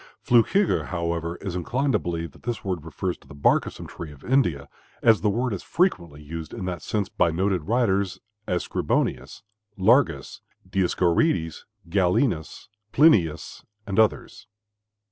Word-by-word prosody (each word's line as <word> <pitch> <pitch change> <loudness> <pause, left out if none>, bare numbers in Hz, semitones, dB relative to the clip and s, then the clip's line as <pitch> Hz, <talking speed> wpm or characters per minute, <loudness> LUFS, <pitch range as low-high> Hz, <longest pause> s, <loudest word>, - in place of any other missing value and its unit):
Flückiger, 150 - +3
however, 85 -1 -2
is 95 -3 -4
inclined 125 - -1
to - - +3
believe 85 -2 -4
that - - -19
this 120 -4 -4
word 90 -5 -2
refers 85 +3 -4
to - - -22
the - - -12
bark 70 - +3
of - - -6
some - - -9
tree 80 -3 -8
of 70 - -15
India, 90 - +1 0.4
as 115 -2 +5
the 105 - +2
word 120 +3 -1
is 95 - -4
frequently 85 - -1
used 80 +2 -7
in 95 - -5
that 90 -1 -4
sense 105 -3 -2
by - - +1
noted 90 0 0
writers, 100 -4 +1 0.3
as 90 -1 -1
Scribonius, 65 +8 -1 0.3
Largus, 95 - +2 0.3
Dioscorides, 90 - +1 0.2
Galenus, 90 - 0 0.2
Plinius, 90 - +3 0.2
and 100 +1 -1
others. 110 -2 0
90 Hz, 150 wpm, -25 LUFS, 80-110 Hz, 0.4 s, as